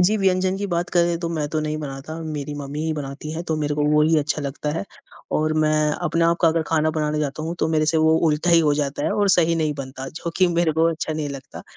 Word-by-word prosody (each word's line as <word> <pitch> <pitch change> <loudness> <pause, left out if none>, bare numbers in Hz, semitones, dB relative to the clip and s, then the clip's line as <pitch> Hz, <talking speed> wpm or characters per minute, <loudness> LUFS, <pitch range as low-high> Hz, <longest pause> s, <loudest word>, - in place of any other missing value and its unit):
जी 195 +5 +4
व्यंजन 190 -1 +1
की 200 - -3
बात 175 -1 -2
करें 170 -1 +2
तो 170 - -2
मैं 155 -3 -2
तो 155 0 -1
नहीं 155 0 -2
बनाता, 145 +2 -6
मेरी 150 -2 -4
मम्मी 145 +1 -5
ही 160 - 0
बनाती 145 0 -6
है, 165 +1 -4
तो 160 -2 -2
मेरे 150 -1 -1
को 150 - 0
वो 150 0 +4
ही 160 0 +4
अच्छा 150 0 -1
लगता 145 +2 -3
है। - - -3 0.5
और 155 0 +1
मैं 155 0 +2
अपने 165 0 +1
आप 170 0 +3
का 165 - +6
अगर 160 0 +1
खाना 155 -1 +2
बनाना 150 -1 -1
चाहता 150 +1 -2
हूँ 165 +2 -3
तो - - +1
मेरे 155 -1 +1
से 160 +1 +2
वो 160 0 +4
उल्टा 155 +3 +1
ही 170 - +7
हो 150 -2 +3
जाता 145 -1 -2
है - - +1
और 205 -1 +1
सही 170 -2 +4
नहीं 155 -2 0
बनता, 135 0 -6
जो 165 +2 -5
कि 185 - +4
मेरे 170 -2 +2
को 160 +1 +2
अच्छा 160 -1 -3
नहीं 155 -2 -3
लगता, 140 -2 -9
155 Hz, 270 wpm, -22 LUFS, 150-165 Hz, 0.5 s, ही